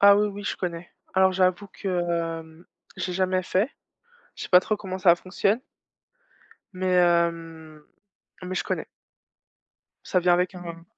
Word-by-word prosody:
Ah 200 0 +8
oui, 210 +1 +2
oui, 205 0 -8
je - - -2
connais. 175 -1 -4 0.2
Alors 190 0 +4
j'avoue 185 +1 +1
que, 170 -4 -2
hem, 160 +1 -16 0.3
j'ai 180 - -3
jamais 185 0 +1
fait, 195 +8 0 0.7
je - - -7
sais - - -7
pas 180 - +8
trop 215 +3 -1
comment 190 -3 -6
ça 180 -2 +6
fonctionne 200 +5 0 1.1
mais, 185 0 -5
hem, 165 -3 0 0.6
mais 185 +1 -4
je - - -2
connais. - - -3 1.2
Ça 185 - +1
vient 175 0 +4
avec 180 +1 0
un 170 -2 -8
180 Hz, 155 wpm, -25 LUFS, 170-190 Hz, 1.2 s, Ah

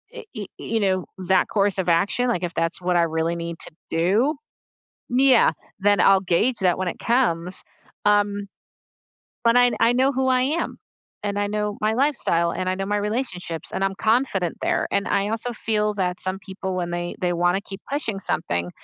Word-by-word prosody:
uh - - -6
uh, - - -6
it - - -18
it 210 -4 -6
you 225 - -2
know, 190 -3 +1
that 185 0 +2
course 200 -1 +1
of 185 -2 0
action, 200 +9 +2
like, 210 -8 0
if 175 0 -2
that's 165 +1 -1
what 180 0 0
I 170 - +4
really 165 +1 0
need 170 0 -5
to - - -9 0.2
do 205 - +2 0.8
yeah, 260 -2 +5 0.3
then 205 0 +3
I'll 195 +1 +5
gauge 215 +8 +2
that 180 -2 +3
when 185 -1 -1
it - - -5
comes 185 -8 0 0.4
um, 205 -1 +2 1.0
but 230 +1 +4
I 245 0 +5
I 235 - +5
know 260 +3 +3
who 265 0 0
I 255 -1 +3
am, 305 +6 -1 0.4
and 205 0 -2
I 205 - +1
know 210 0 -2
my 215 +1 +1
lifestyle, 240 - +1
and 185 - -2
I 185 - +1
know 195 +1 -3
my 205 0 0
relationships, 205 -6 -3
and 195 - -1
I'm 195 - 0
confident 215 -5 +1
there, - - 0
and 200 - 0
I 200 0 +1
also 225 +3 -2
feel 210 -2 0
that 180 -3 -2
some 185 +1 -2
people 190 -1 -5
when 175 -1 -2
they 175 0 -3
they 180 -1 +1
wanna 175 +3 +2
keep 195 -1 -9
pushing 250 -8 -2
something 85 - -2
200 Hz, 200 wpm, -23 LUFS, 180-225 Hz, 1.0 s, yeah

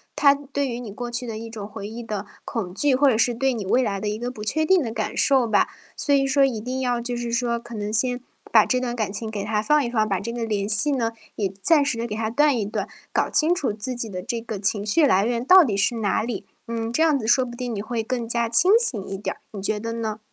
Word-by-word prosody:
它 280 -1 +6
对 280 0 -3
于 240 -1 -4
你 230 -4 -7
过 240 +4 -6
去 240 +1 -4
的 220 -2 -4
一 225 0 -8
种 210 -3 -6
回 210 -1 -7
忆 230 +2 -7
的 215 -3 -4 0.2
恐 190 -6 -4
惧， 275 +4 +2
或 280 +2 +4
者 245 - +4
是 235 +1 +2
对 265 +2 +1
你 210 -5 -4
未 255 +6 +3
来 200 -4 -1
的 210 - -1
一 210 - -3
个 245 +2 -4
不 215 -4 -8
确 315 +8 0
定 375 0 +4
的 230 - -3
感 225 - -3
受 265 -3 +3
吧。 215 - +3 0.3
所 285 - 0
以 275 -1 +4
说 275 0 +3
一 245 -5 +1
定 255 +4 -4
要 245 -1 0
就 240 +1 -4
是 240 -1 -3
说 235 0 0
可 235 0 -10
能 210 0 -4
先 245 +2 +1 0.3
把 - - +6
这 255 - +1
段 245 -1 -3
感 215 -4 -2
情 220 +2 -4
给 205 -2 -4
他 210 0 0
放 300 +6 +3
一 - - -2
放， 215 -3 +1
把 195 - 0
这 230 +3 -4
个 235 -1 -3
联 205 -2 -1
系 220 +8 +3
呢， 235 -5 0 0.2
也 205 - 0
暂 315 +2 +5
时 265 -4 -1
地 235 +1 -2
给 210 - -4
他 220 0 -1
断 290 +1 +3
一 210 - -1
断， 210 - -3 0.3
搞 - - +1
清 320 +3 +3
楚 305 -9 -1
自 220 +4 -5
己 235 -2 -3
的 185 -2 -5
这 235 - -2
个 225 -3 -5
情 200 +1 0
绪 295 +9 +3
来 200 -7 +3
源 235 0 -1
到 375 +3 +9
底 225 -9 -1
是 200 +4 +2
哪 210 -1 0
里。 210 -4 -4 0.2
嗯， 230 0 -3
这 320 - +3
样 310 -3 +4
子 220 - -4
说 255 +2 +4
不 240 - -8
定 245 -2 -3
你 200 - -3
会 225 +1 -3
更 240 +1 -2
加 235 0 0
清 350 +11 +5
醒 245 - 0
一 195 - -4
点 205 - -4
儿， - - -26
你 205 - -7
觉 210 +2 -1
得 230 +1 -4
呢？ 220 -2 -3
235 Hz, 310 characters per minute, -23 LUFS, 215-255 Hz, 0.3 s, 到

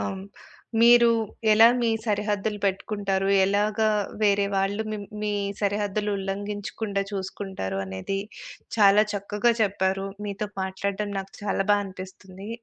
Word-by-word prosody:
అవును. 145 - -4 0.6
మీరు 235 0 +7 0.4
ఎలా 225 +2 +8
మీ 235 - +2 0.2
సరిహద్దులు 210 0 -1
పెట్టుకుంటారు? 195 0 -1 0.2
ఎలాగా 210 +2 +1 0.3
వేరే 200 -1 +3
వాళ్ళు 195 +2 0
మిం 210 -1 -4 0.2
మీ 210 - -1 0.3
సరిహద్దులు 205 0 -1
ఉల్లంఘించకుండా 200 +1 -3
చూసుకుంటారు? 190 - -4
అనేది 95 - -4 0.6
చాలా 205 0 +6
చక్కగా 205 +4 +1
చెప్పారు. 195 -1 0 0.2
మీతో 205 +1 -4
మాట్లాడటం 200 +2 -3
నాకు 195 0 -12
చాలా 195 -1 0
బా 205 - +4
అనిపిస్తుంది 190 +1 -10
200 Hz, 115 wpm, -25 LUFS, 195-210 Hz, 0.6 s, ఎలా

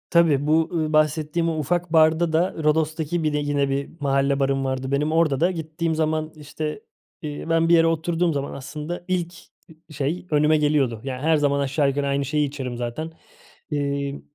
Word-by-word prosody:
Tabii 155 -4 +3
bu, 160 +1 +3
ııı, 155 -2 -1
bahsettiğim 155 +2 +1
o 160 - -2
ufak 175 +3 -1
barda 160 +1 +4
da, 170 +4 +1
Rodos'taki 160 +2 0
bir 155 -1 0
de - - +1
yine 145 -1 0
bir 140 +1 -2
mahalle 140 -1 +1
barım 135 0 +1
vardı 130 0 -2
benim, 145 +2 +1
orada 160 -4 +2
da 175 +4 +3
gittiğim 160 -1 -3
zaman 155 0 -1
işte, 150 +4 -5 0.4
iii, 150 +1 -6
ben 165 0 +2
bir - - +5
yere 165 0 +5
oturduğum 165 +1 0
zaman 140 -1 -3
aslında 150 +5 -6
ilk, 180 -2 -1 0.4
ııı, 160 - -17 0.2
şey 150 +6 -2
önüme 150 +1 +4
geliyordu. 145 -7 +1
Yani 130 -1 -5
her 160 +2 +3
zaman 140 -1 +1
aşağı 140 +1 +1
yukarı 140 +1 -1
aynı 140 0 0
şeyi 150 +2 +1
içerim 135 -3 -5
zaten. 120 +7 -4 0.6
Emm, 140 -1 -2
150 Hz, 185 wpm, -23 LUFS, 140-160 Hz, 0.6 s, bir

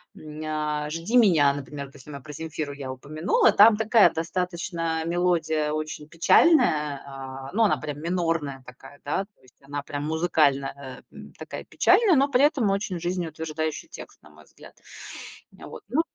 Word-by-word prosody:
м, 155 0 -10
ня 150 -1 -2
"Жди 165 +10 -1
меня"- 160 -11 +5
например, 140 0 -7
вот 135 - -20
если 135 - -14
мы 140 -1 -8
про 150 +2 -10
"Земфиру" 155 -1 -5
я 135 -2 -6
упомянула. 155 +7 +1
Там 210 +1 +7
такая, 220 -5 +5
достаточно 165 -1 -3
мелодия 165 -3 0
очень 155 -1 -5
печальная, 155 - +3
а, 135 -1 -8
ну, 225 +2 +3
она 210 - +3
прям 150 -1 -6
минорная 165 -6 -2
такая, 135 +2 -14
да, 150 +7 -1
то 205 - -37
есть, 130 -1 -23
она 145 +1 -5
прям 145 0 -5
музыкально, 140 -4 0
эм, - - -12
такая - - -7
печальная, 410 -8 +3
но 275 +1 +4
при 270 0 +2
этом 270 -8 +3
очень 195 -3 -2
жизнеутверждающий 160 -3 -4
текст, - - -12
на 75 - -18
мой 75 +1 -18
взгляд. - - -17 0.8
Вот. - - -11
Ну. 295 +7 +2
155 Hz, 165 wpm, -25 LUFS, 145-180 Hz, 0.8 s, Там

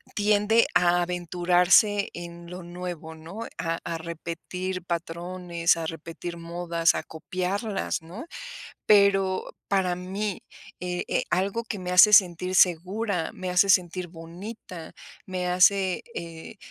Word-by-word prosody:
tiende 210 +2 +3
a 175 0 +4
aventurarse 180 +3 +3
en 170 0 -9
lo 180 +1 -7
nuevo, 175 -2 -7
¿no?, 170 +8 -8
a 165 -1 -2
a 170 - -3
repetir 170 +3 -5
patrones, 170 0 -1
a 165 - -3
repetir 165 +2 -6
modas, 170 0 0
a - - -2
copiarlas, 185 +5 -3
¿no?, 175 - -9 0.6
pero 195 -2 +4 0.2
para 185 -3 +1
mí, 190 +3 -4 0.4
eh 180 0 -3
eh, - - 0
algo 195 +6 0
que 215 -3 -5
me 180 -1 -5
hace 195 +4 +8
sentir 180 -1 +5
segura, 185 +1 +2
me 185 -1 -5
hace 180 +2 +3
sentir 180 -1 +1
bonita, 175 +1 -9 0.3
me 185 -1 -3
hace, 185 +1 +3
eh, 165 +4 -8
180 Hz, 125 wpm, -26 LUFS, 170-190 Hz, 0.6 s, hace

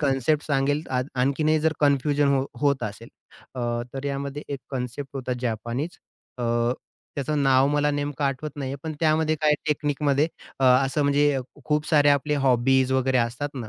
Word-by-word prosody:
Concept 140 +1 +1
सांगेल 145 +1 +1
आ 125 -1 +1 0.2
आणखीनही 155 +4 +2
जर 160 0 +2
confusion 145 0 +2
हो 135 0 +1 0.2
होत 140 -3 +2
असेल, 110 +2 -6 0.5
अ, 125 - -4 0.3
तर 135 - -5
यामध्ये 140 +1 -3
एक 140 -2 -4
कन्सेप्ट 130 +1 -4
होता 130 -1 -3
जपानीच 120 +6 -3 0.4
अ, 120 - -3 0.7
त्याचं 145 +1 -1
नाव 135 0 +4
मला 150 0 +2
नेमकं 145 0 -2
आठवत 140 +2 -2
नाहीये. 135 -1 -4
पण 160 -1 -4
त्यामध्ये 155 0 +2
काही 150 -1 +4 0.2
तकनीकमध्ये 145 0 +1 0.3
अ, - - +3
असं 135 +3 +4
म्हणजे 145 0 +3 0.3
खूप 150 0 0
सारे 145 -2 +4
आपले 145 +1 +2
हॉबीज 130 +1 +3
वगैरे 130 -1 +2
असतात 120 +5 -1
ना, 120 -5 -6
140 Hz, 160 wpm, -25 LUFS, 130-150 Hz, 0.7 s, नाव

